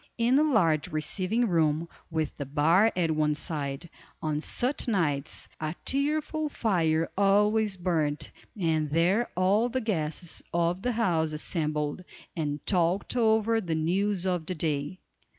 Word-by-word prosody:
In 235 +2 +2
the 295 - +5
large 175 - +2
receiving 185 +9 0
room 160 -2 +1 0.2
(with 160 -3 -2
the 140 - -4
bar 165 +10 +4
at 170 -3 +1
one 150 -1 +1
side), 145 -1 -4 0.3
on 155 -1 -2
such 255 - -1
nights, 155 - -1
a 155 +1 -3
cheerful 305 +2 0
fire 165 - +1
always 205 +1 +3
burned, 160 -5 -1 0.3
and 160 -4 +1
there 175 +9 +2
all 200 +6 +3
the 260 - -1
guests 170 -6 -2
of 170 +2 +1
the 245 +3 -1
house 165 -9 +1
assembled, 150 0 -2 0.3
and 150 -3 -3
talked 180 +3 +1
over 225 -1 +3
the 170 -5 -2
news 185 +4 0
of 180 -3 -1
the 185 - -2
day. 150 +1 -2
175 Hz, 140 wpm, -28 LUFS, 155-210 Hz, 0.3 s, the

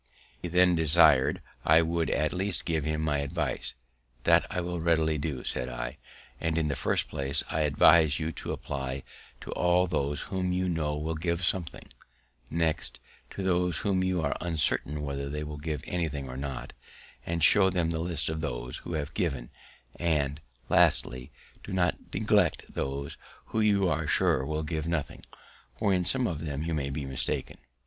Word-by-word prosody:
He - - -3
then 90 +1 +4
desir'd 80 -4 +5 0.2
I 80 +2 +6
would 80 -2 0
at 75 0 +1
least 95 +1 -1
give 80 -4 0
him 75 0 -1
my 75 -2 +1
advice. 70 -3 -3 0.5
"That - - +4
I - - -2
will 90 0 -3
readily 80 -2 +2
do," 70 -3 -3
said 60 -1 -2
I; 60 +2 -5 0.4
"and, 80 0 -1
in 80 -2 +1
the 70 - -1
first - - 0
place, 70 +1 -1
I 80 - 0
advise 75 +1 +5
you 80 0 -2
to - - -5
apply 65 -1 -4 0.4
to - - -7
all 90 +1 +3
those 75 -4 -1
whom 90 -1 -2
you 90 0 0
know 75 -4 -1
will 80 +2 -2
give 85 +2 -1
something; 85 -1 -2 0.6
next, 80 -1 -1 0.3
to 100 - -6
those 90 -2 +1
whom 95 -2 +2
you 90 -3 0
are 70 - 0
uncertain 75 -3 0
whether 70 -1 -3
they 75 +1 -3
will 75 0 -6
give 75 -2 -4
anything 80 -6 -2
or 65 - -7
not, 65 -2 -5 0.5
and 85 -1 -2
show 95 -2 +6
them 85 -3 0
the 80 - -2
list 85 -3 -1
of 80 0 -2
those 60 -4 -3
who 85 - -7
have 75 0 -3
given; 70 - -2 0.5
and, 75 -4 0 0.3
lastly, 65 +1 +2 0.3
do - - -8
not 90 -2 +2 0.2
neglect - - +2
those 70 +1 -3 0.3
who 110 - -2
you 100 -3 +3
are 80 -1 0
sure 65 - +2
will 80 0 -2
give 80 0 -3
nothing, 85 -4 -3 0.5
for 100 -3 +2
in 90 -1 +2
some 130 +7 +1
of 80 -7 -3
them 75 -1 -3
you 85 0 -2
may 70 -3 -1
be 70 0 -4
mistaken." 65 -1 -2
80 Hz, 180 wpm, -29 LUFS, 70-85 Hz, 0.6 s, I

